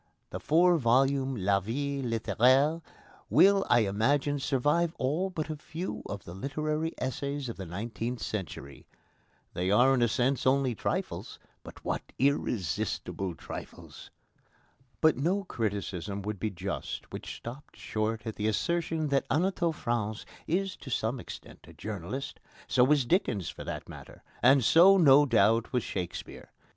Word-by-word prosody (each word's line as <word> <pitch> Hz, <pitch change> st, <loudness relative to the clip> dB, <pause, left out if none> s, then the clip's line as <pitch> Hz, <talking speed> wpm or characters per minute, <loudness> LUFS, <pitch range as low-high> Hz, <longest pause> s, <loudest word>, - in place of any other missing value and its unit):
The -, -, -4 dB
four 175 Hz, +3 st, +4 dB
volumes 135 Hz, +2 st, +2 dB
of -, -, -4 dB
La 100 Hz, 0 st, +4 dB
Vie 140 Hz, +7 st, -3 dB
Littéraire 130 Hz, +6 st, +2 dB, 0.5 s
will, 195 Hz, 0 st, +5 dB
I 120 Hz, -, +5 dB
imagine, 135 Hz, +8 st, +1 dB
survive 150 Hz, +5 st, +1 dB
all 155 Hz, +9 st, 0 dB
but 160 Hz, -4 st, -4 dB
a -, -, -3 dB
few 160 Hz, +4 st, -6 dB
of 100 Hz, -2 st, -6 dB
the 85 Hz, -, -9 dB
literary 150 Hz, -, -2 dB
essays 140 Hz, +1 st, -3 dB
of 115 Hz, -, -5 dB
the 95 Hz, -2 st, -6 dB
nineteenth 115 Hz, +6 st, -4 dB
century. 85 Hz, -11 st, -6 dB, 0.7 s
They 90 Hz, +1 st, -1 dB
are 125 Hz, +7 st, +5 dB
in 130 Hz, -, +2 dB
a 120 Hz, -, +4 dB
sense 130 Hz, +4 st, 0 dB
only 130 Hz, -1 st, +3 dB
trifles, -, -, -3 dB, 0.2 s
but -, -, -13 dB
what -, -, -1 dB, 0.2 s
irresistible 95 Hz, -, -1 dB
trifles! -, -, -9 dB, 0.9 s
But 160 Hz, -4 st, +4 dB
no 180 Hz, +9 st, 0 dB
criticism 100 Hz, -, -3 dB
would 105 Hz, -1 st, -4 dB
be 110 Hz, -, -1 dB
just 95 Hz, 0 st, -5 dB
which -, -, -6 dB
stopped 125 Hz, +5 st, -10 dB
short 110 Hz, 0 st, -2 dB
at 110 Hz, -, -5 dB
the 105 Hz, -, -1 dB
assertion 160 Hz, +6 st, 0 dB
that 140 Hz, -1 st, +1 dB
Anatole 170 Hz, +2 st, +1 dB
France 115 Hz, -6 st, -3 dB, 0.2 s
is 190 Hz, +3 st, 0 dB
to -, -, -10 dB
some 115 Hz, +1 st, -1 dB
extent -, -, -10 dB
a -, -, -14 dB
journalist. 105 Hz, +6 st, -6 dB, 0.3 s
So 125 Hz, -, +4 dB
was 140 Hz, 0 st, +3 dB
Dickens 120 Hz, -, 0 dB
for -, -, -8 dB
that -, -, -5 dB
matter, -, -, -12 dB, 0.2 s
and 130 Hz, +2 st, +6 dB
so, 180 Hz, -, +7 dB
no 145 Hz, -4 st, +6 dB
doubt, 115 Hz, 0 st, +3 dB
was 125 Hz, -3 st, 0 dB
Shakespeare. 90 Hz, -3 st, -6 dB
130 Hz, 150 wpm, -29 LUFS, 110-150 Hz, 0.9 s, so